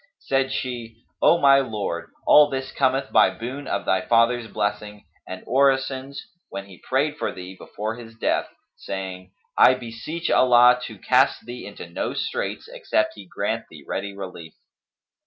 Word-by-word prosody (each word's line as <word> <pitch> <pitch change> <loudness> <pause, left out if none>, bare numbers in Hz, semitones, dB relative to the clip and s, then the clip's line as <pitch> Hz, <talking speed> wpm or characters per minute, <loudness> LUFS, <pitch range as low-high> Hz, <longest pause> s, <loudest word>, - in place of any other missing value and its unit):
Said 135 0 0
she, 120 -4 -5 0.2
"O 170 - +6
my 140 -3 +6
lord, 100 -9 -3 0.2
all 150 -1 +7
this 135 -1 -4
cometh 135 0 0
by - - +6
boon 130 +5 -7
of - - -2
thy 95 - +2
father's 115 +3 +2
blessing 105 0 -3 0.2
and 95 0 -7
orisons 135 +1 +1 0.3
when 100 - -6
he 95 -3 -15
prayed 145 +3 +1
for - - -2
thee, 90 +1 -9
before 110 +4 -6
his 115 -2 -11
death, 115 - 0 0.3
saying, 95 -1 -6 0.3
'I 130 - +7
beseech 130 +7 -5
Allah 125 0 +6
to 110 - -9
cast 130 +7 +2
thee 120 -2 -8
into 100 -3 -9
no 85 - -4
straits - - -3
except 110 - -1
He 100 -3 -12
grant - - -3
thee - - -14
ready 100 0 -4
relief!' 90 -4 -8
115 Hz, 155 wpm, -23 LUFS, 100-135 Hz, 0.3 s, all